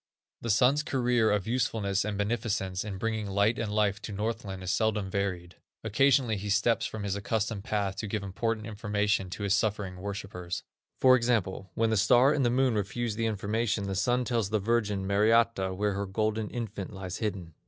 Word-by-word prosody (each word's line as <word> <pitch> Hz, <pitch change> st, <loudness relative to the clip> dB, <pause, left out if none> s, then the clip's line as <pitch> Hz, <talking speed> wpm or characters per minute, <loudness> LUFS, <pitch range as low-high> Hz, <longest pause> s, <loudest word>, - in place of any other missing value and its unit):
The 115 Hz, -, -4 dB
Sun's 125 Hz, +7 st, +4 dB
career 125 Hz, -5 st, +2 dB
of 105 Hz, -2 st, +1 dB
usefulness 110 Hz, -5 st, 0 dB
and 105 Hz, 0 st, -3 dB
beneficence 100 Hz, -3 st, -1 dB
in 100 Hz, -2 st, -5 dB
bringing 110 Hz, 0 st, -2 dB
light 100 Hz, +4 st, +2 dB
and 110 Hz, -2 st, -2 dB
life 105 Hz, -1 st, +1 dB
to -, -, -6 dB
Northland 105 Hz, -2 st, -4 dB
is 90 Hz, -, -1 dB
seldom 105 Hz, -4 st, 0 dB
varied. 90 Hz, -3 st, -3 dB, 0.3 s
Occasionally 120 Hz, 0 st, +3 dB
he 105 Hz, +1 st, -5 dB
steps 105 Hz, +4 st, +2 dB
from 110 Hz, -2 st, -6 dB
his 100 Hz, -1 st, -1 dB
accustomed 105 Hz, 0 st, -2 dB
path 100 Hz, -2 st, -1 dB
to 110 Hz, -, -3 dB
give 105 Hz, 0 st, -3 dB
important 110 Hz, +3 st, -2 dB
information 105 Hz, -2 st, -1 dB
to 95 Hz, +3 st, -6 dB
his 100 Hz, -1 st, +2 dB
suffering 100 Hz, -2 st, -1 dB
worshipers. 95 Hz, -3 st, -5 dB, 0.4 s
For 130 Hz, -1 st, +7 dB
example, 110 Hz, -6 st, 0 dB
when 115 Hz, 0 st, +2 dB
the 110 Hz, -, +2 dB
Star 125 Hz, +7 st, +5 dB
and 145 Hz, -, +1 dB
the 120 Hz, -, +3 dB
Moon 130 Hz, 0 st, +2 dB
refuse 105 Hz, +2 st, -2 dB
the 115 Hz, 0 st, 0 dB
information, 110 Hz, +1 st, -1 dB
the 100 Hz, 0 st, -3 dB
Sun 120 Hz, +6 st, +1 dB
tells 115 Hz, -6 st, 0 dB
the 110 Hz, -, +1 dB
Virgin 105 Hz, -2 st, 0 dB
Mariatta, 105 Hz, -1 st, +2 dB
where 105 Hz, +1 st, 0 dB
her 100 Hz, 0 st, -3 dB
golden 110 Hz, +2 st, -1 dB
infant 110 Hz, -5 st, -5 dB
lies 95 Hz, -2 st, -6 dB
hidden. 95 Hz, -7 st, -4 dB
105 Hz, 185 wpm, -29 LUFS, 100-115 Hz, 0.4 s, For